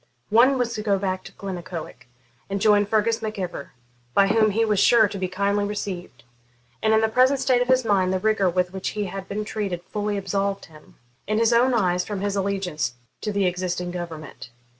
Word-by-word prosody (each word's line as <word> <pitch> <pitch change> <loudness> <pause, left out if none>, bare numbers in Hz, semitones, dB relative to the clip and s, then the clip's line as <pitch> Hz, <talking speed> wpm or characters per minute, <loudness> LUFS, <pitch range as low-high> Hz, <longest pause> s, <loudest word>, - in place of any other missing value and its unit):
One 250 +5 +5
was 240 -2 -1
to 215 - -3
go 205 -2 +1
back 190 -1 -2
to - - -10
Glennaquoich 175 -7 -7 0.4
and 200 0 -2
join 205 0 +4
Fergus 225 +2 +1
Mac 215 -1 -4
Ivor, 175 -6 -5 0.4
by 195 0 +5
whom 220 0 +4
he 225 +3 +1
was 210 -3 +1
sure 225 -1 +6
to 200 0 -7
be 185 - -1
kindly 200 +2 0
received; 185 -9 -5 0.6
and 220 - +2
in 220 0 +4
the 220 - +3
present 255 +4 +3
state 255 -2 +2
of 245 - 0
his 255 -1 +3
mind, 190 -3 +2
the 190 - +1
rigour 200 -1 +2
with 180 +1 -1
which 190 0 -3
he 210 - 0
had 195 0 -6
been 210 +1 -3
treated 195 -5 -3
fully 205 +2 -3
absolved 195 0 -2
him, 155 -2 -18 0.3
in 215 +1 0
his 230 +1 +3
own 245 +2 +4
eyes, 180 -4 +1
from 205 -3 -5
his 200 0 -1
allegiance 185 -10 -2 0.3
to 210 - -2
the 200 -1 +1
existing 180 0 -2
government. 165 -7 -7
200 Hz, 205 wpm, -24 LUFS, 185-220 Hz, 0.6 s, sure